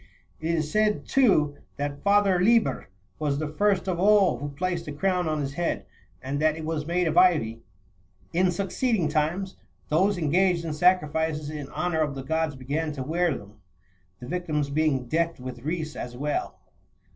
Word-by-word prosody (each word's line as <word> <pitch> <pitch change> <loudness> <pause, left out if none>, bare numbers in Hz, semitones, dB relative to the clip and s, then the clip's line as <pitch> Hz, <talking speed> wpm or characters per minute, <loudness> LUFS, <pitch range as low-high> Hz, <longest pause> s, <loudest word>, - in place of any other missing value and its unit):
It 165 +2 -1
is 155 -2 -2
said, 215 0 +1
too, 155 - +3 0.2
that 145 0 -3
Father 200 -2 +3
Liber 225 - +2 0.3
was 145 -2 0
the 155 +1 -2
first 195 +4 +1
of 180 -2 -1
all 200 -1 +4
who 145 - -4
placed 175 +4 -3
a - - -4
crown 180 +3 0
on 155 -1 -1
his 140 -1 -3
head, 170 +3 -2 0.4
and 135 +2 -2
that 155 0 +2
it 160 - -6
was 155 -1 -3
made 175 0 +1
of 160 +2 +4
ivy.27 150 -12 +3 0.7
In 180 +1 +3
succeeding 200 - 0
times, 165 +6 -1 0.3
those 190 +6 +2
engaged 175 +2 +2
in 160 - -2
sacrifices 160 -3 +1
in 145 -3 -6
honour 175 -3 -1
of 145 -2 -1
the 135 - -5
gods 160 +1 -1
began 145 +5 -2
to 135 -3 -4
wear 165 +1 0
them, 105 +1 -14 0.6
the 120 - -9
victims 155 -4 -2
being 145 -4 +1
decked 165 +5 -1
with 125 -1 -7
wreaths 155 +2 -3
as 120 0 -6
well. 145 +2 -2
160 Hz, 175 wpm, -26 LUFS, 145-180 Hz, 0.7 s, all